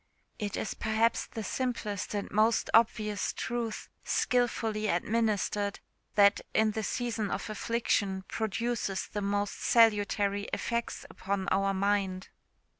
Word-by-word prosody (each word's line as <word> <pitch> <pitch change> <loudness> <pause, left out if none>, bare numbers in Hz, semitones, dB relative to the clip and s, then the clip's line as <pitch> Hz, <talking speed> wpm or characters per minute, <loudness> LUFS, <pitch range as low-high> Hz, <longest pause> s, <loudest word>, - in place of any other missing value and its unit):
It 205 -2 -3
is 205 - -2
perhaps 220 +1 +1
the 220 - -6
simplest 215 -4 -2
and 200 - -2
most 220 +2 +2
obvious 215 -2 +2
truth, 230 -2 -3 0.2
skilfully 225 -3 +1
administered, 205 +1 0 0.4
that, 200 0 +5
in 220 0 +4
the 220 - -3
season 225 -2 -2
of 215 - -3
affliction, 205 -4 0
produces 220 -2 -2
the 205 - -5
most 205 0 -1
salutary 205 -3 +3
effects 235 0 -2
upon 190 0 -3
our 195 0 +2
mind. 195 -1 0
210 Hz, 115 wpm, -30 LUFS, 200-225 Hz, 0.4 s, that